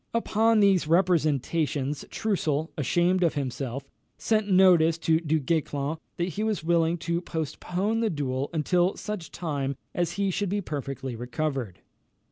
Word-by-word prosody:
Upon 225 -1 +3
these 190 -5 +4
representations, 155 -4 +1
Troussel, 160 -7 -1
ashamed 175 +4 +1
of 170 -3 +2
himself, 135 -1 -4 0.3
sent 215 -2 0
notice 180 -4 +5
to 160 -1 +2
Du 160 -1 0
Guesclin 145 0 -1 0.2
that 175 +1 -1
he 200 +5 -3
was 215 -6 -1
willing 170 0 +2
to 170 +1 -2
postpone 180 +6 -2
the 225 -1 +1
duel 140 -4 -2
until 175 +3 +1
such 210 -6 -5
time 140 -5 -3 0.2
as 175 -1 -1
he 200 0 0
should 200 +1 -1
be 205 +2 0
perfectly 135 -7 -5
recovered. 125 - -3
165 Hz, 140 wpm, -27 LUFS, 145-185 Hz, 0.3 s, notice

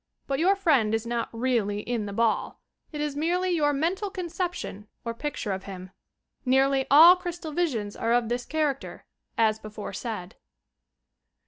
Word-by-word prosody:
But 270 -1 -1
your 375 +4 +4
friend 270 - +3
is 225 +1 -3
not 235 0 -2
really 225 -4 0
in 230 -2 -3
the - - -5
ball; 225 +1 0 0.3
it 300 - -6
is 295 -1 -2
merely 355 +5 0
your 300 -4 +2
mental 345 +8 -1
conception 350 - -4 0.2
or 230 - -2
picture 235 -4 -4
of 190 0 -4
him. 185 -1 -8 0.5
Nearly 270 +1 +3
all 325 +6 +9
crystal 350 -3 -6
visions 255 -12 -1
are 230 - -1
of 240 -1 +3
this 245 +2 -2
character, 300 -3 -2 0.3
as 220 -1 +3
before 215 -2 -7
said. 200 -4 -6
260 Hz, 155 wpm, -26 LUFS, 220-320 Hz, 0.5 s, all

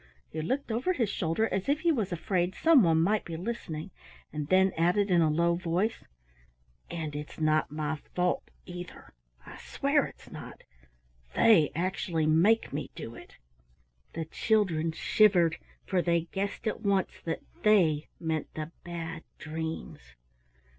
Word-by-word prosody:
He 160 - -3
looked 260 - -2
over 250 +12 +1
his 230 - 0
shoulder 170 +6 0
as 190 +6 -1
if 295 +2 +2
he 340 - +3
was 220 - -1
afraid 175 +1 -1
some 320 -5 +6
one 165 -4 +4
might 210 +4 +2
be 165 -1 -6
listening, 180 -4 -5 0.4
and 150 -1 -3
then 190 +2 +4
added 180 +5 +2
in 175 -1 +5
a 160 - +4
low 170 +3 +2
voice, 180 +6 -1 0.9
"And 155 -3 -4
it's 150 +1 -7
not 155 0 +2
my 155 0 -2 0.2
fault, 180 0 0 0.2
either, 175 -1 -9 0.3
I - - -10
swear - - +1
it's - - -15
not. - - -10 0.7
They 180 -10 +6
actually 170 -2 -1
make 170 +8 +3
me 140 -1 -3
do 115 - -7
it!" - - -13 0.8
The 165 -1 -3
children 165 -3 +1
shivered, 175 -1 +3 0.3
for 185 -2 +1
they 170 -1 +2
guessed 200 +3 -3
at 215 - -2
once 200 -3 0
that 165 -1 -3 0.2
"they" 170 -8 +4
meant 160 -2 -2
the 155 +1 -5
Bad 165 -1 -5 0.2
Dreams. 160 +1 -5
175 Hz, 150 wpm, -29 LUFS, 160-200 Hz, 0.9 s, some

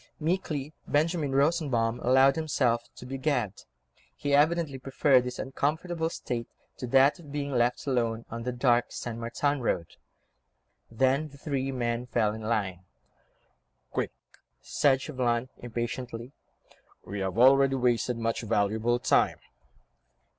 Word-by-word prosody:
Meekly 155 -3 -2
Benjamin 155 -1 +1
Rosenbaum 135 -6 +1
allowed 130 +2 +5
himself 130 -7 0
to - - -10
be 135 +1 -5
gagged; 125 -8 -1 0.5
he, 145 -1 -2
evidently, 150 -1 +2
preferred 135 0 +3
this 125 0 -5
uncomfortable 160 +5 -1
state 120 -7 -4 0.3
to 125 - -5
that 135 +6 +4
of 150 -4 -12
being 145 -1 -3
left 120 -1 +1
alone, 115 -4 0
on 115 +1 -5
the 125 +2 -2
dark 120 -1 +3
St. 115 -1 -5
Martin 130 +5 -1
Road. 85 -8 -2 0.9
Then 135 +6 +1
the 140 - -15
three 135 -2 -2
men 120 -1 -2
fell 110 -3 +1
in 110 - -7
line. 105 -5 -1 1.1
"Quick!" - - -1 0.5
said 135 -2 +2
Chauvelin, 125 -3 -1
impatiently, 120 +1 -5 0.7
"we 100 - -5
have 95 0 -2
already 135 +2 +6
wasted 125 -1 +1
much 115 0 -1
valuable 110 +2 +1
time." 125 - +2
130 Hz, 130 wpm, -28 LUFS, 115-140 Hz, 1.1 s, already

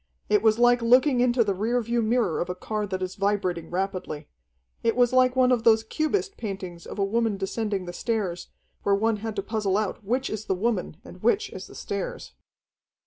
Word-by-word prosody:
It 210 -1 +4
was 220 0 +4
like 245 0 +4
looking 250 +3 +4
into 245 -1 +3
the 205 -2 0
rear 225 +6 0
view 235 0 0
mirror 225 -6 +1
of 175 - -3
a 180 - -2
car 210 +2 -3
that 185 -1 -3
is 185 0 -3
vibrating 195 -5 -1
rapidly. 180 -5 -3 0.5
It 230 -1 +1
was 245 0 +3
like 255 0 +4
one 255 -1 +4
of 240 -3 +2
those 225 -1 +5
Cubist 310 - -1
paintings 190 -5 -6
of - - -8
a 200 - +2
woman 225 0 0
descending 200 0 -2
the 175 - -6
stairs, 190 -6 -2 0.3
where 200 - +2
one 220 +2 +1
had 220 +1 -5
to 195 - -2
puzzle 210 -2 0
out 215 +1 -2
which 250 +6 0
is 215 0 -4
the 190 - 0
woman 195 -5 -1
and 185 -8 -12
which 400 - +1
is - - -8
the - - -14
stairs. - - -5
215 Hz, 205 wpm, -26 LUFS, 195-240 Hz, 0.5 s, those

